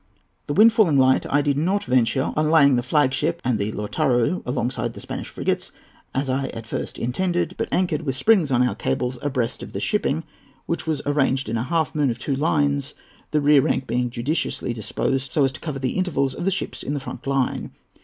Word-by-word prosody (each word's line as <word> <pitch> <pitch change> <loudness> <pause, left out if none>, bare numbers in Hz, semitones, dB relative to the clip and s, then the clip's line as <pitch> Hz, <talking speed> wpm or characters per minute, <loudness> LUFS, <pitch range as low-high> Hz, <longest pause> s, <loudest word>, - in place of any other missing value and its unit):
"The 145 - -1
wind 220 +4 +7
falling 195 - +4
light, 130 0 +4
I 145 +1 +2
did 145 -1 +1
not 190 +6 +1
venture 130 - +1
on 155 0 +1
laying 140 -4 +6
the 120 - +1
flag 130 +1 +2
ship 165 +5 -1
and 120 -4 +1
the 100 +2 -1
Lautaro 120 - 0
alongside 125 0 -2
the - - -10
Spanish - - -6
frigates, - - -2 0.4
as 135 +1 0
I 135 +1 0
at 115 -1 -7
first - - -5
intended, 175 +7 -1
but - - -2
anchored 175 -4 +1
with 135 -5 -2
springs 180 -2 +3
on 125 0 +3
our - - -1
cables, 125 0 -2
abreast 130 -4 -1
of - - -9
the - - -3
shipping, 165 -7 0 0.4
which 170 - -3
was 155 -3 -1
arranged 135 -3 +1
in 115 - -1
a - - -1
half 160 +2 0
moon 150 -3 +1
of 115 - -2
two 135 +3 -2
lines, 145 -1 0 0.3
the 150 - +1
rear 145 -1 +6
rank 130 - 0
being 125 0 -1
judiciously 130 0 -2
disposed 130 +4 -2
so 145 - +3
as 135 - +2
to 155 - -9
cover 150 -4 -4
the 130 -2 -1
intervals 140 -8 0
of 175 - -5
the - - +3
ships 195 - -4
in 145 - -3
the - - -1
front 135 - -8
line. 135 -2 0
140 Hz, 215 wpm, -23 LUFS, 125-155 Hz, 0.4 s, wind